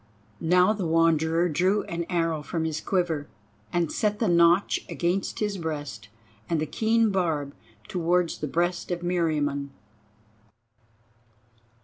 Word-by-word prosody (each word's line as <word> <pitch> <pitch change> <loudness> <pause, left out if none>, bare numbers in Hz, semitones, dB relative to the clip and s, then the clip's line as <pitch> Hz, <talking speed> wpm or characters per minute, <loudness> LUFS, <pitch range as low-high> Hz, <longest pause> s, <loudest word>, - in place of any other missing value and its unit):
Now 180 +5 +4
the 200 -5 -3
Wanderer 165 +1 +3
drew 185 +6 +1
an 170 0 -4
arrow 165 -3 0
from 160 +2 -3
his 155 -1 -2
quiver, 170 -6 -1 0.4
and 170 -2 0
set 210 -2 0
the 225 - 0
notch 170 +2 +4
against 180 +2 -1
his 210 -3 -2
breast 145 -10 -5 0.4
and 165 -2 +1
the 155 - 0
keen 225 +6 +2
barb 160 -7 -1 0.3
towards 180 -3 0
the 150 - -3
breast 175 +4 -1
of 175 -1 -2
Meriamun. 150 -5 0
170 Hz, 125 wpm, -26 LUFS, 160-180 Hz, 0.4 s, Now